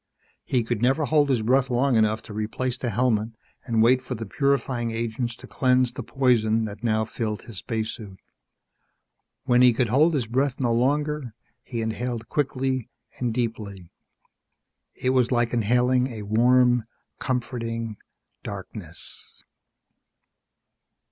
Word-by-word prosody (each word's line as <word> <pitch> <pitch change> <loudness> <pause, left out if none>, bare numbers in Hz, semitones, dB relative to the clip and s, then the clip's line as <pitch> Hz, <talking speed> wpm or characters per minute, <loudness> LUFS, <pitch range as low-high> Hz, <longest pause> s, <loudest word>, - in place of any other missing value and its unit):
He 125 -3 0
could 115 -1 -2
never 135 +5 +2
hold 150 -1 +3
his 120 -5 +1
breath 130 +3 +3
long 125 +1 +2
enough 110 0 +2
to 110 - -10
replace 110 +4 -2
the 125 -2 -3
helmet 115 -1 +1 0.4
and 115 -2 +2
wait 125 +2 +4
for 130 0 -5
the 115 0 -5
purifying 130 0 0
agents 115 +1 -3
to - - -13
cleanse 125 -2 +2
the - - -5
poison 115 -4 +2
that 105 +1 -8
now 110 -1 +1
filled 110 -2 -4
his 110 -6 -8
spacesuit. 110 -3 -4 1.3
When 125 -2 +3
he 125 -1 +7
could 120 0 0
hold 150 +7 +4
his 130 -5 0
breath 130 +4 0
no 120 -3 +1
longer, 145 0 0 0.3
he 120 -2 -4
inhaled 115 +1 -3
quickly 130 -3 -1 0.3
and 125 -2 0
deeply. 105 -6 -4 1.0
It 130 - 0
was 130 -1 +2
like 120 -1 +1
inhaling 125 +3 +2
a 110 -5 -7
warm, 120 +2 +4 0.3
comforting 115 -3 -3 0.4
darkness.... - - -8
120 Hz, 135 wpm, -25 LUFS, 110-130 Hz, 1.3 s, he